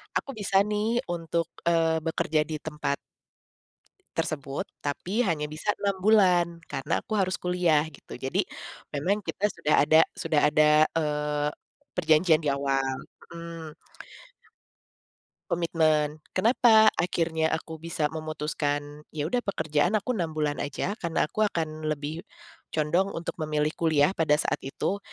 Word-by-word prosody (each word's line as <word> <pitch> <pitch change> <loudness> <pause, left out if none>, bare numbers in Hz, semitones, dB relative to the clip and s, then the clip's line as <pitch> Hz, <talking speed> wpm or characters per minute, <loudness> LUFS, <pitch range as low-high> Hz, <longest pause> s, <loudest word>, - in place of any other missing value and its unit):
aku - - -1
bisa 195 -1 +3
nih 210 +3 0
untuk, 165 -1 -2 0.2
eee, 165 -1 +3
bekerja 155 -1 0
di 155 - -3
tempat 150 -2 -2 1.2
tersebut 140 -4 -2 0.2
tapi 185 +11 -1
hanya 150 -3 0
bisa 155 +7 -5
6 200 -1 0
bulan 185 -5 +5 0.2
karena 135 - -3
aku 220 - -6
harus 185 -1 +1
kuliah 180 -4 +2
gitu - - -17
jadi 135 - -1 0.5
memang 180 +9 +1
kita 205 - -1
sudah 150 - 0
ada 155 +2 +5 0.3
sudah 150 - +2
ada, 155 +1 +4 0.3
eee, 150 -1 0 0.5
perjanjian 160 -1 +4
diawal, 135 -2 0 0.4
mhm. 165 -2 -8 1.7
Komitmen 155 -3 +1 0.2
kenapa 220 +1 +6
akhirnya 165 -2 +1
aku 160 -1 -7
bisa 160 -2 -2
memutuskan 150 -1 -3
ya 145 - -1
udah 245 - +2
pekerjaan 160 +2 +1
aku 215 +4 0
6 170 -8 -2
bulan 150 -1 -1
aja 145 +7 -2
karena 170 -2 0
aku 185 - -5
akan 155 -4 -3
lebih, 150 +2 -3 0.5
condong 170 +6 0
untuk 165 +1 -5
memilih 150 0 0
kuliah 155 -1 +3
pada 160 -5 +2
saat 150 - -1
itu, 190 +8 -3
160 Hz, 130 wpm, -27 LUFS, 150-180 Hz, 1.7 s, kenapa